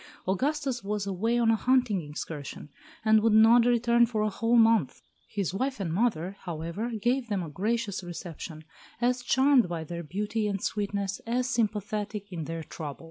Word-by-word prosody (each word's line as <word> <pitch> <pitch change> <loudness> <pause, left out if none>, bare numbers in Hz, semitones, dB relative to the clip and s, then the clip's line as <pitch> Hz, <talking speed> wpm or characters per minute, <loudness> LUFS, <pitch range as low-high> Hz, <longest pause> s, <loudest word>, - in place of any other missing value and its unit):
Augustus 265 +4 -1
was 205 0 -2
away 205 +5 0
on 230 -1 +4
a - - +4
hunting 250 -5 +2
excursion, 150 -1 -7 0.4
and 220 0 +5
would 225 0 +3
not 230 +2 +7
return 235 0 +4
for 220 -2 +1
a 215 - +1
whole 230 +4 +1
month. 225 - +3 0.3
His 195 -4 -2
wife 260 +6 -2
and 170 -5 -2
mother, 195 -3 0
however, 170 +6 -4
gave 245 +3 +1
them 200 -4 -1
a 165 - -6
gracious 205 +4 -2
reception, 170 -2 -7 0.4
as 250 +1 +1
charmed 260 -3 +4
by 165 -2 -3
their 170 +2 -6
beauty 210 +6 -2
and 200 -1 -1
sweetness 200 -1 -2
as 245 +2 0
sympathetic 210 -3 -2
in 165 -3 -4
their 165 +1 -5
trouble. 150 -2 -7
210 Hz, 170 wpm, -28 LUFS, 180-235 Hz, 0.4 s, not